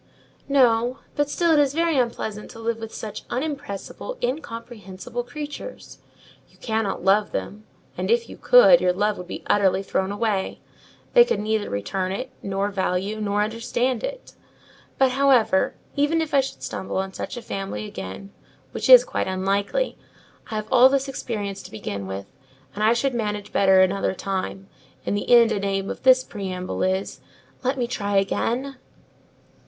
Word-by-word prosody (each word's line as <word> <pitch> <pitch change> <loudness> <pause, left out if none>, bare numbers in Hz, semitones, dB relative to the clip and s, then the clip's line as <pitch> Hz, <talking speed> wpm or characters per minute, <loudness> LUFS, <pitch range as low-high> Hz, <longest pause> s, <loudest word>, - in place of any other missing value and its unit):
"No, 245 -2 +3 0.2
but 290 -1 +1
still 340 +3 +1
it 310 - +5
is 285 -1 +2
very 335 -1 +2
unpleasant 230 -4 -2
to 225 - -11
live 225 0 -1
with 225 -1 -7
such 215 -2 -7
unimpressible, 285 - -5
incomprehensible 230 -4 -5
creatures. 295 - -8 0.5
You - - -25
cannot 220 -3 -2
love 205 +2 +3
them; 215 +1 -5 0.3
and - - -3
if 470 0 +2
you - - -10
could, - - +7
your 180 0 +3
love 205 +3 +1
would 180 - -8
be - - -7
utterly 195 -1 +2
thrown 190 0 -1
away: 205 -2 -1 0.5
they 485 - +9
could 475 - -1
neither 215 0 -1
return 185 - -2
it, 255 +7 -4
nor 195 +1 -2
value, 195 +2 -1
nor 205 0 +1
understand 230 - -1
it. - - -6 0.6
But, 265 -1 +4
however, 255 -7 +3 0.2
even 295 +3 +2
if 320 -2 -3
I 280 - +6
should 270 0 -3
stumble 190 - -4
on 190 0 -2
such - - -6
a - - -5
family 195 - -4
again, 95 - -8 0.4
which - - -3
is - - +11
quite - - -2
unlikely, 195 - -1 0.5
I 220 - -4
have 215 0 -3
all 255 0 +7
this 275 0 0
experience 210 -7 -4
to - - -11
begin 100 -2 -5
with, 95 +1 -5 0.5
and 210 - -3
I 220 +2 +5
should 260 +3 0
manage 210 -3 -3
better 190 -1 +5
another 190 0 +1
time; 195 0 -4 0.4
and - - 0
the 205 - -3
end 235 -2 +7
and 200 - -1
aim 195 0 -1
of - - -7
this 260 0 +6
preamble 185 -4 -5
is, 190 +1 -1 0.4
let 260 +2 0
me 245 - 0
try 205 -4 -2
again." 250 +7 -1
220 Hz, 170 wpm, -24 LUFS, 195-260 Hz, 0.6 s, is